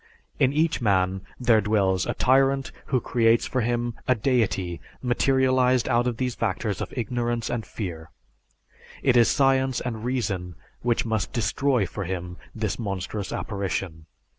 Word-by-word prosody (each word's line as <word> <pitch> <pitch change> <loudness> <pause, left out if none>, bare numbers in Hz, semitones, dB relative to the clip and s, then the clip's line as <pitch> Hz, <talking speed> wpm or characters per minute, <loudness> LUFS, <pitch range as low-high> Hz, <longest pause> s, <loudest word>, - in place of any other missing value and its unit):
In 135 - +4
each 155 0 +1
man 95 -3 +2 0.2
there 115 -3 +4
dwells 95 -3 +1
a - - -1
tyrant 135 +1 +3 0.2
who 130 - +2
creates 115 -1 +2
for 130 - -1
him 120 0 -1
a 130 - +4
deity 105 -8 0 0.2
materialized 130 0 +2
out 120 -1 +2
of 120 -2 -2
these 125 0 -1
factors 110 -2 -2
of - - -4
ignorance 120 0 -1
and 120 -2 -2
fear. 80 -6 -6 0.9
It 130 -3 +4
is 120 -1 +6
science 135 -2 +2
and 115 -3 -4
reason 100 -9 -2 0.3
which 120 -1 +1
must 110 -2 -1
destroy 125 -1 +1
for 95 +2 -5
him 90 0 -5 0.2
this 110 -2 -2
monstrous 100 -1 -4
apparition. 95 -5 -3
115 Hz, 145 wpm, -25 LUFS, 95-125 Hz, 0.9 s, is